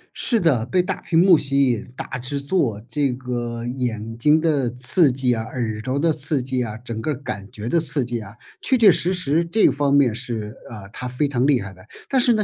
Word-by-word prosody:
是 235 - +2
的， 150 - +2
被 180 +8 +1
大 190 +1 -4
屏 165 - -1
幕 175 -1 +6
吸 140 -2 +2
引， 120 +1 -5
大 - - -5
制 130 +3 -4
作， 140 - -1
这 140 +3 0
个 120 -2 -5
眼 115 -3 -4
睛 150 +7 +3
的 150 -6 +1
刺 130 +6 +3
激 125 -1 +1
啊， 115 - -2
耳 110 -2 -4
朵 130 +4 -3
的 165 +3 +2
刺 145 -2 +1
激 130 -1 -1
啊， 110 -2 -6
整 115 -1 -6
个 150 +4 -2
感 120 -7 -7
觉 110 +1 -7
的 170 - +2
刺 150 -4 +3
激 120 -1 -4
啊， 105 0 -12 0.3
确 260 - +1
确 220 -5 +7
实 175 +2 +1
实 170 -3 +1
这 205 +6 +3
方 140 0 0
面 140 -5 +4
是 115 -2 -5
啊， 105 -4 -9
它 125 +4 -7
非 125 +4 -1
常 130 -1 0
厉 140 -4 +3
害 100 -1 -7
的。 95 0 -17 0.2
但 265 -2 +2
是 240 -1 +4
呢， 215 -1 +1
130 Hz, 245 characters per minute, -21 LUFS, 115-155 Hz, 0.3 s, 确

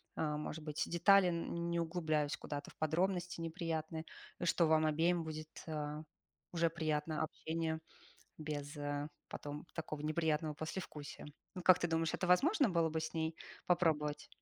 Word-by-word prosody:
э, - - 0
может 155 +1 -4
быть, 150 -1 -1
детали, 190 +2 +6
не 170 0 -1
углубляясь 160 -3 0
куда-то 145 -1 -5
в - - -22
подробности 175 +2 0
неприятные, 160 -1 -3 0.4
что 170 0 +4
вам 155 0 +5
обеим 165 +3 +2
будет, 155 0 -7
а, 150 -1 -3 0.5
уже 170 -1 +3
приятно 155 -1 -1
общение 160 0 -2 0.6
без 150 -1 -4 0.5
потом 145 +2 -6
такого 155 -2 -4
неприятного 155 0 +1
послевкусия. 155 -2 -6 0.3
Вот 180 -2 -6
как 185 -1 +8
ты 175 - 0
думаешь, 165 0 +1
это 185 - 0
возможно 280 - +5
было 170 -2 +3
бы 160 +1 -1
с 160 - -3
ней 160 0 -1 0.3
попробовать? 155 -4 +2
160 Hz, 140 wpm, -36 LUFS, 155-170 Hz, 0.6 s, как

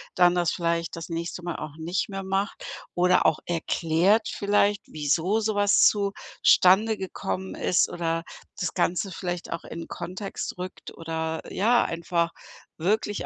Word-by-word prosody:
dann 175 -1 +5
das 175 -2 +1
vielleicht 170 -1 -1
das 165 0 -7
nächste 170 +1 -4
Mal 175 -2 -3
auch 155 0 -7
nicht 170 +5 -2
mehr 195 -1 -5
macht 195 +2 -2 0.3
oder 180 +1 +4
auch 155 - +3
erklärt 175 +5 +2
vielleicht, 205 0 +2
wieso 160 +7 +1
so 215 0 0
was 205 0 +4
zustande 205 +1 +3
gekommen 190 0 -4
ist 180 - +2
oder 165 -1 -2 0.4
das 180 - -2
Ganze 185 +2 0
vielleicht 175 -1 -4
auch 170 - -5
in 165 0 -7
Kontext 185 +4 -5
rückt 180 0 -7
oder, 160 0 -3
ja, 235 +5 +3
einfach 170 0 -1 0.5
wirklich 205 +4 0
180 Hz, 145 wpm, -26 LUFS, 165-200 Hz, 0.5 s, dann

